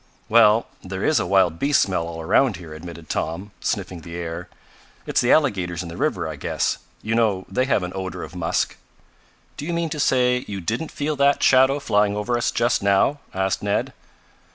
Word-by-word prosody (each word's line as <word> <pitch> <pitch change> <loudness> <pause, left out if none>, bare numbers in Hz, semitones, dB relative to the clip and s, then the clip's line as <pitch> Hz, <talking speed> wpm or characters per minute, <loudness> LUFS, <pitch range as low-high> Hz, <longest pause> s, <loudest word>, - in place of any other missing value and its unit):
"Well, 115 0 +5 0.2
there 95 +1 -4
is 155 - +3
a - - -2
wild 90 -3 +3
beast 145 0 +3
smell 90 -4 -2
all 85 -1 -7
around 110 +8 +3
here," 85 -3 -10
admitted 85 0 -10
Tom, 95 +6 -3
sniffing 90 -3 -3
the 85 +1 -9
air. 85 0 -5 0.6
"It's - - +1
the 120 - +2
alligators 95 - +2
in 85 - -8
the 85 - -8
river - - -1
I - - -6
guess. - - -1 0.2
You 110 - -1
know 110 -5 +1
they 130 +1 0
have 120 -8 +1
an 90 - -4
odor 95 -1 -5
of - - -9
musk." 85 -2 -1 0.8
"Do 145 - -5
you 175 - -2
mean 170 -1 -1
to 150 - -4
say 125 -2 +2
you 100 -1 -4
didn't 115 - -3
feel 150 +1 -2
that 140 +1 +3
shadow 130 +2 +5
flying 105 -5 +1
over 120 +4 -1
us 120 - +1
just 120 +1 +1
now?" 100 +9 +2
asked 95 0 -1
Ned. 100 0 -1
100 Hz, 200 wpm, -22 LUFS, 90-125 Hz, 0.8 s, Well